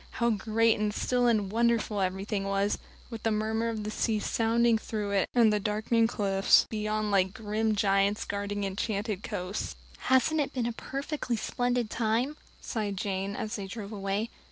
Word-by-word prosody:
How 235 -1 +1
great 220 +2 +2
and 210 0 +1
still 245 +3 +1
and 210 -5 +2
wonderful 230 -2 +1
everything 195 +2 -1
was, 195 +1 0 0.3
with 225 -2 -6
the 225 - +1
murmur 220 +1 0
of 220 -2 -3
the 215 - -4
sea 220 0 0
sounding 230 +1 +2
through 210 -2 -3
it 195 -1 +1
and 225 -3 +5
the 210 - +2
darkling 215 +2 +1
cliffs 195 -4 +3
beyond 215 -1 -1
like 190 0 +2
grim 215 0 0
giants 200 0 +2
guarding 205 0 -3
enchanted 200 +1 -2
coasts. 180 0 -4 0.2
"Hasn't 280 +4 +3
it 280 - -3
been 245 -2 0
a 235 - -1
perfectly 275 0 -3
splendid 245 -1 -1
time?" 235 +5 0 0.2
sighed 205 -3 -3
Jane, 195 0 -2
as 215 +2 -3
they 195 -1 -5
drove 205 0 -7
away. 200 +2 -2
215 Hz, 170 wpm, -29 LUFS, 200-230 Hz, 0.3 s, and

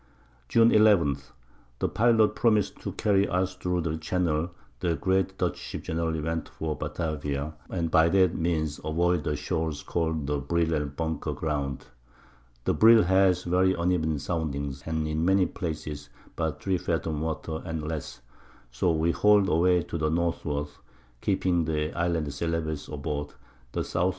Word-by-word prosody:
June 115 0 +5
11. 100 -10 +5 0.6
The - - 0
Pilot 110 -2 +3
promis'd 105 -4 +2
to - - -4
carry 100 -1 +2
us 95 +1 0
thro' 90 -1 -1
the 80 -1 -2
Channel 85 -1 0 0.3
the 85 -2 0
great 95 +1 0
Dutch 90 -4 -1
Ships - - -7
generally 80 0 -1
went 80 0 -3
for 80 -1 -4
Batavia, 75 -1 -3 0.2
and 85 -3 -2
by 80 +1 +5
that 95 -2 +4
Means 80 -3 -1
avoid 85 +1 +1
the 75 - 0
Shoals 75 +1 -2
call'd 80 -3 -1
the 75 0 -1
Brill 80 +4 0
and 75 -2 -2
Bunker 80 -1 -2
Ground; 70 -4 -3 0.8
the - - +1
Brill 110 +8 +7
has 95 0 +3
very 90 +2 +2
uneven 85 -3 0
Soundings, 70 -3 -3
and 80 -1 -1
in 75 +1 -1
many 95 +1 +4
Places 75 -4 -5 0.3
but 80 -1 -3
3 95 -2 +1
Fathom 80 -3 -2
Water 80 0 -3
and 80 -3 -4
less, 80 -2 -5 0.5
so 65 +8 +1
we 80 +1 +2
hall'd 105 0 +4
away 90 +1 +3
to 85 - -5
the 75 0 +1
Northward, 80 -3 -1 0.5
keeping 90 -4 +1
the 75 -1 -1
Islands 85 -4 -1
Celebes 80 -2 -2
aboard, 75 0 -4 0.4
the - - -2
S. - - -7
W. 90 +2 +2
80 Hz, 155 wpm, -27 LUFS, 75-90 Hz, 0.8 s, Brill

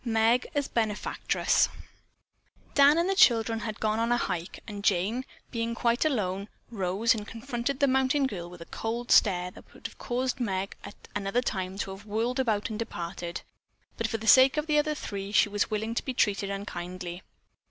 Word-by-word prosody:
MEG 230 +1 +2
AS 285 -1 +1
BENEFACTRESS 220 -3 +1 1.0
Dan 285 +2 +6
and 340 +2 +2
the 390 - +2
children 230 - +5
had 220 -2 -5
gone 215 0 0
on 230 +1 +1
a 240 - +4
hike, 175 -7 -3
and 205 -2 -7
Jane, 205 +7 +1 0.3
being 230 -1 -2
quite 235 0 +1
alone, 200 -9 -1 0.2
rose 200 +2 +1
and 210 -2 -5
confronted 240 +3 -3
the 280 - +5
mountain 265 +1 +2
girl 175 -9 -4
with 175 -1 -12
a - - -7
cold 235 +5 -4
stare 180 -3 +4
that - - -16
would - - -17
have - - -7
caused 255 +1 -2
Meg 195 -4 -2
at 200 - -9 0.2
another 200 +5 0
time 190 -4 -3
to 195 - -3
have 195 +2 -10
whirled 230 +5 -1
about 220 -4 0
and 215 - -4
departed, 170 -5 -5 0.5
but - - -1
for 225 - -2
the 220 - -8
sake 260 +5 +7
of 300 - 0
the 300 -2 +3
other 305 0 0
three 200 -6 -5
she 210 - +4
was 205 0 0
willing 220 +1 -2
to - - -2
be 260 - -4
treated 200 -4 +1
unkindly. 180 -2 -5
225 Hz, 190 wpm, -28 LUFS, 195-250 Hz, 1.0 s, sake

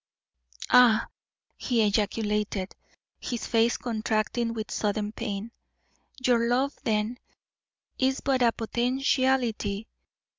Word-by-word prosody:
"Ah!" 245 -3 +6 0.5
he 235 -4 +1
ejaculated, 210 -1 -1 0.5
his 240 -3 -4
face 230 0 +2
contracting 225 0 -1
with 225 -1 -5
sudden 210 0 -1
pain; 215 -1 -5 0.7
"your 235 -2 +3
love, 260 +4 +1
then, 220 +3 -1 0.8
is 265 0 +1
but 265 -2 +1
a 235 -1 +5
potentiality. 240 -3 0
230 Hz, 90 wpm, -27 LUFS, 215-245 Hz, 0.8 s, Ah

